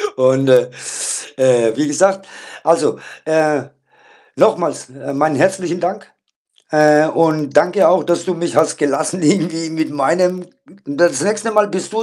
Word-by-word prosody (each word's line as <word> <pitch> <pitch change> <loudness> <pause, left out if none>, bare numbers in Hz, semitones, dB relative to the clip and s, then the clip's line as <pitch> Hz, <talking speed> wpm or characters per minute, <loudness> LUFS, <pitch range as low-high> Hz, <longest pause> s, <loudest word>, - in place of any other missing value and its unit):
Und, 130 +1 +2
äh, 125 -1 +5 0.7
äh, 120 -4 +2
wie 150 - 0
gesagt, 195 +6 +1 0.4
also, 165 +1 +1 0.3
äh, 155 -3 +1 0.7
nochmals, - - +1
äh, 140 +1 -9
meinen 150 +1 0
herzlichen 180 +2 0
Dank, 175 +2 -4 0.6
äh, 150 0 +4
und 155 -4 0
danke 180 +6 +4
auch, 180 -1 +3
dass 170 -1 -1
du 185 - -2
mich 170 -2 -4
hast 155 0 +2
gelassen 155 +4 -2
irgendwie 165 0 0
mit 160 0 -3
meinem 180 +6 0 0.4
m 145 - -6
das 175 0 +2
nächste 210 +2 -1
Mal 210 -1 +3
bist 185 +2 -5
du 225 - -1
160 Hz, 150 wpm, -16 LUFS, 145-180 Hz, 0.7 s, äh